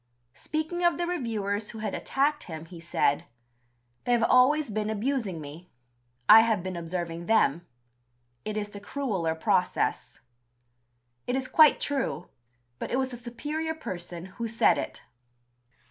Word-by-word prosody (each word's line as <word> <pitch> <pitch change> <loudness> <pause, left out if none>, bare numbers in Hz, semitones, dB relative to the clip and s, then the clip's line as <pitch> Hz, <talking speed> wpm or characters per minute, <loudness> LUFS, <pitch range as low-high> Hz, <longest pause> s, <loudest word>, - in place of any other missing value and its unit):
Speaking 315 - -3
of 345 -1 +3
the 345 - -1
reviewers 220 - -2
who 225 - -7
had 215 -2 -3
attacked 295 +2 0
him, 160 -2 -7
he 170 0 -11
said: 160 -3 +1 0.8
"They 245 - +2
have 235 -1 +3
always 255 +2 +4
been 215 0 -1
abusing 220 - -1
me. 155 +4 -10 0.6
I 225 - +11
have 220 -5 +1
been 185 -1 -4
observing 170 0 -4
them. 175 -7 +2 0.8
It 215 0 -4
is 205 -1 -3
the 205 - -8
crueller 200 -8 -2
process." 160 - 0 1.1
It 245 - 0
is 265 -1 -2
quite 310 0 +6
true, 270 -10 -2 0.5
but - - -4
it 250 - 0
was 260 -1 -1
a - - -3
superior 295 +7 -4
person 175 - -6
who 230 +5 -5
said 225 +1 +3
it. - - -6
220 Hz, 145 wpm, -28 LUFS, 175-270 Hz, 1.1 s, I